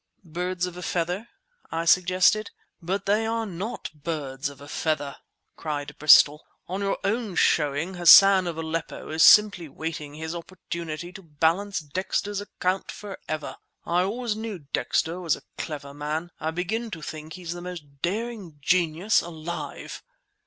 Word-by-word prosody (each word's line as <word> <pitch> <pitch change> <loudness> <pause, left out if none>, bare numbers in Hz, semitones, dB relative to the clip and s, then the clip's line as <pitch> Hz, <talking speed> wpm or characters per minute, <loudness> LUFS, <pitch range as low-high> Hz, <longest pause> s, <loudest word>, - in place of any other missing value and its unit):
"Birds 180 +2 -2
of 180 -1 -7
a 180 - -7
feather—" 180 +5 -2 0.4
I 165 +1 -2
suggested. 185 +4 +4 0.3
"But 190 +4 -2
they 210 +3 +2
are 225 0 -1
not 200 +5 -5
birds 145 -3 -4
of 140 - -13
a 145 - -11
feather!" 145 -2 -2 0.4
cried 145 -2 -4
Bristol. 150 0 +7 0.2
"On 190 +3 -3
your 195 0 0
own 215 -1 -1
showing, 150 +4 +2
Hassan 185 +1 +8
of 165 -2 -4
Aleppo 165 0 -4
is 160 +1 0
simply 200 -6 +7
waiting 150 0 -5
his 160 +1 -5
opportunity 170 -1 -6
to 195 - -10
balance 165 +5 0
Dexter's 190 +6 -2
account 190 -2 -2
forever! 155 -7 -6 0.3
I 175 +1 +2
always 220 +4 -1
knew 215 -8 -6
Dexter 165 +2 0
was 170 -5 +1
a - - -14 0.2
clever 145 -3 -5
man; 155 +4 -3
I 160 - -1
begin 195 +8 -2
to 165 -7 -7
think 155 +1 -7
he's 175 0 -5
the 175 - -8
most 150 -6 -9
daring 205 -4 -3
genius 175 +6 +2
alive!" 170 0 -6
175 Hz, 150 wpm, -26 LUFS, 155-195 Hz, 0.4 s, Hassan